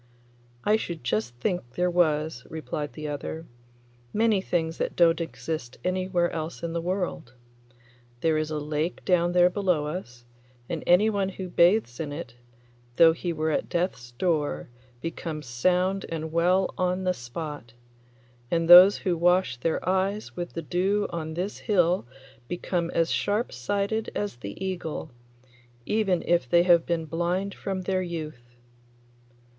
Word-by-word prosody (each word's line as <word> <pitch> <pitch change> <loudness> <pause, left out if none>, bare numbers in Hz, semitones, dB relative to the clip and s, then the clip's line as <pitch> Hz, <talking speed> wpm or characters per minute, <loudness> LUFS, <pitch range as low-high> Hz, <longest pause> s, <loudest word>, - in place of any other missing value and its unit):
'I 210 +1 +4
should 170 - -6
just 120 0 -1
think 125 - -3
there 180 - +1
was,' 155 -6 +1
replied 150 -2 -5
the 155 -1 -6
other; 150 +3 -5 0.7
'many 215 -2 +2
things 165 -3 -1
that - - -2
don't 170 -1 +4
exist 160 -6 -5
anywhere 185 -1 0
else 160 +1 -5
in 165 -1 -3
the 170 - -1
world. 175 -8 -3 0.9
There 160 -1 +2
is 155 0 -1
a 155 - -2
lake 150 +3 -3
down 175 -1 +2
there 180 0 +5
below 180 -6 +1
us, 125 -7 -6 0.4
and 165 - -4
anyone 200 +1 +4
who 190 -1 -6
bathes 175 - +3
in 150 -3 -3
it, 145 -5 -7 0.6
though 165 +2 +7
he 175 +1 -3
were 160 -1 -1
at - - -1
death's 145 -9 -2
door, 145 - -1 0.3
becomes 165 -2 -5
sound 180 +10 +1
and 160 -1 -4
well 180 +3 +2
on 185 +1 0
the 185 0 +2
spot, 125 -2 -7 0.8
and 165 -1 +1
those 180 +3 +10
who 180 -2 0
wash 175 -5 +2
their 165 +6 -2
eyes 190 +3 0
with 175 -1 -5
the 165 - -4
dew 195 +6 +1
on 160 -2 -4
this 185 +4 -3
hill 180 - +2 0.4
become 175 +1 -2
as 165 0 +2
sharp 210 +4 0
sighted 200 - -1
as 205 -11 -3
the 115 - -6
eagle, 170 -5 -4 0.7
even 205 -5 +1
if 170 -8 +2
they 170 +4 +5
have 175 -2 +4
been 170 -2 -1
blind 175 +5 -1
from 190 -1 -4
their 185 0 0
youth. 155 -9 -7
170 Hz, 150 wpm, -26 LUFS, 155-185 Hz, 0.9 s, those